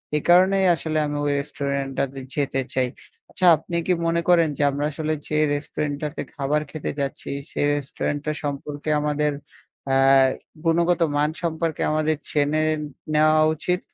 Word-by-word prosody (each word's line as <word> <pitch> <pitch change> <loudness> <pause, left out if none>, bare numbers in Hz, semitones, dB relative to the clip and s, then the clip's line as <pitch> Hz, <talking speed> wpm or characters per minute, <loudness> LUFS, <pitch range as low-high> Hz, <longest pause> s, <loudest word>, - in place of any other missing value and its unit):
এই 150 - +1
কারণেই 190 +2 +5
আসলে 155 0 -3
আমি 145 0 -3
ওই 145 - +1
রেস্টুরেন্টটাতে 140 -1 -3 0.2
যেতে 135 -2 0
চাই। 130 -1 +1 0.4
আচ্ছা 185 - -1
আপনি 165 +3 -7
কি 180 - +4
মনে 170 0 +1
করেন 170 -2 +5
যে - - +1
আমরা 145 +1 -2
আসলে 155 +2 -2
যে 150 - -1 0.2
রেস্টুরেন্টটাতে 145 +1 -3
খাবার 150 +1 0
খেতে 155 - -4
যাচ্ছি 140 -1 -4 0.2
সে - - -6
রেস্টুরেন্ট 145 0 -2
টা 155 - 0
সম্পর্কে 145 +1 -4
আমাদের 150 0 0 0.6
আ - - +4 0.7
গুণগত 170 +1 +2
মান 150 +1 +2
সম্পর্কে 165 -1 -2
আমাদের 155 0 +1 0.2
জেনে 150 +1 +1 0.5
নেওয়া 155 +1 +4
উচিত? 180 +3 -1
150 Hz, 145 wpm, -23 LUFS, 145-160 Hz, 0.7 s, কারণেই